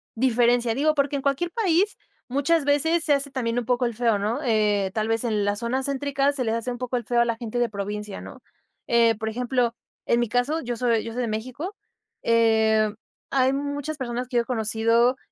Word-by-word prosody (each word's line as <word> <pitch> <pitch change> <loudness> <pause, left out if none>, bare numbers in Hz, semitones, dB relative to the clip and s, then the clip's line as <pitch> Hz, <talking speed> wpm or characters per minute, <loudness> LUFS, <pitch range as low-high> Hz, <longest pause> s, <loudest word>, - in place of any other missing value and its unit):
diferencia. 240 -1 +2
Digo, 305 +4 +1
porque 280 0 +1
en 275 - -4
cualquier 280 +6 0
país, 400 -1 +1 0.3
muchas 285 +4 +1
veces 320 +4 +3
se 300 - +4
hace 280 0 +1
también 245 -3 -1
un 240 - -5
poco 245 +1 +1
el 235 - -1
feo, 230 -2 +1
¿no? 220 +6 -1
Eh, 210 -4 +2
tal 215 0 -1
vez, 225 +1 +1
en 210 -3 0
la 205 - +1
zona 235 +4 -2
céntricas 280 +1 0
se 255 - -1
les 225 -1 0
hace 230 +2 -3
un 245 - -5
poco 250 0 -2
el 240 - -4
feo 240 +1 +2
a - - +3
la 230 -1 -1
gente 235 0 -4
de 240 - +1
provincia, 205 0 -5
¿no? - - -11 0.5
Eh, 230 -1 +4
por 220 +1 -3
ejemplo, 245 0 -1 0.3
en 235 - +2
mi 240 - 0
caso, 275 +8 0
yo 240 -1 -3
soy 230 -2 +1
yo 230 - -6
soy 250 - -2
de - - -1
México. 255 - -5 0.5
Em, 220 -2 +3 0.4
hay 265 -1 +3
muchas 285 +2 -3
personas 245 -1 -4
que 245 -1 -2
yo 235 - +3
he - - -21
conocido 230 +1 +2
240 Hz, 220 wpm, -24 LUFS, 225-275 Hz, 0.5 s, se